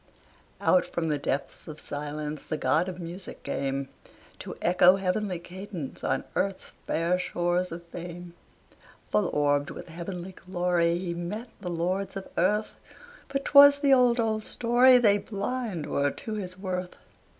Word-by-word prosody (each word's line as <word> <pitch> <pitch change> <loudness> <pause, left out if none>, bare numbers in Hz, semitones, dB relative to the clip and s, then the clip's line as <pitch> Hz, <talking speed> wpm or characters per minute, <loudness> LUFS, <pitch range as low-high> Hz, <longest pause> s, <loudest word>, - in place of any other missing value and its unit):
Out 180 - +4
from 165 -2 -3
the 150 -1 0
depths 140 0 -3
of 155 -1 -8
silence 150 +1 -5
The 155 - -3
god 155 +7 +1
of 180 -1 -7
music 175 +2 -7
came, 135 0 -2 0.5
To - - -7
echo 180 +1 +5
heavenly 195 0 -1
cadence 180 -3 -8
On 135 - 0
earth's 195 -1 -1 0.2
fair 170 +3 +1
shores 175 0 -1
of 170 +1 -7
fame. 175 0 -8 0.8
Full 205 -4 +2
orbed, 145 -1 +1
with - - -9
heavenly 175 +2 -6
glory, 175 -2 0
He 175 -1 -3
met 200 +8 -5
the 185 -3 -5
lords 180 +4 -2
of 195 - -6
earth. 210 +5 +1 0.5
But 275 0 -3
'twas 285 0 +8
the 285 -1 +4
old, 250 -2 +4
old 220 -1 0
story, 245 +3 +5
They 205 -4 +4
blind 210 -4 -3
were 140 0 +1
to 220 +9 -6
his 185 -3 -5
worth. 185 -2 -4
180 Hz, 150 wpm, -27 LUFS, 170-205 Hz, 0.8 s, twas